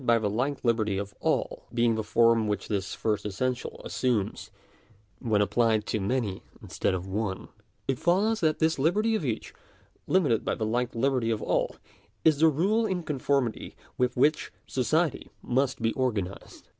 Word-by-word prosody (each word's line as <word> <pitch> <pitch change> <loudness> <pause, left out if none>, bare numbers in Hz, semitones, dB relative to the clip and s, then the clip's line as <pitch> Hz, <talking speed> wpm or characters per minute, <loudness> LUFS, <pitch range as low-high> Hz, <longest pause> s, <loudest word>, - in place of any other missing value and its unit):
by 115 -1 +4
the 105 -3 -1
like 135 +7 -1
liberty 110 -4 +1
of 100 +1 -4
all, - - -1
being 120 -1 +2
the 110 0 -2
form 115 0 +3
which 105 -1 -2
this 100 -3 -2
first 105 -2 -1
essen 105 +5 0
tial 125 - -9
assumes 120 -6 -1 0.7
when 110 -3 +1
applied 110 +1 +2
to 110 - -1
many 100 -2 -1 0.2
instead 95 - -1
of 90 0 -4
one 95 0 -2
(§ - - -12
8), - - -27 0.4
it 135 - 0
follows 205 +6 +2
that 155 -2 +2
this 160 -2 +1
liberty 210 +10 +2
of 215 - 0
each, 120 -6 -3 0.5
limited 150 - +2
by - - -1
the 110 - -2
like 120 +3 -1
liberty 125 -1 +1
of 110 -2 -1
all, - - 0 0.5
is 155 -3 +5
the 160 - +6
rule 200 +10 +2
in 185 -3 -2
conformity 140 -5 -1 0.2
with 125 0 0
which 150 +4 +2
society 155 +4 0
must 130 +1 0
be 115 - +2
organ 120 -7 0
ised. 100 - -13
120 Hz, 180 wpm, -27 LUFS, 110-145 Hz, 0.7 s, the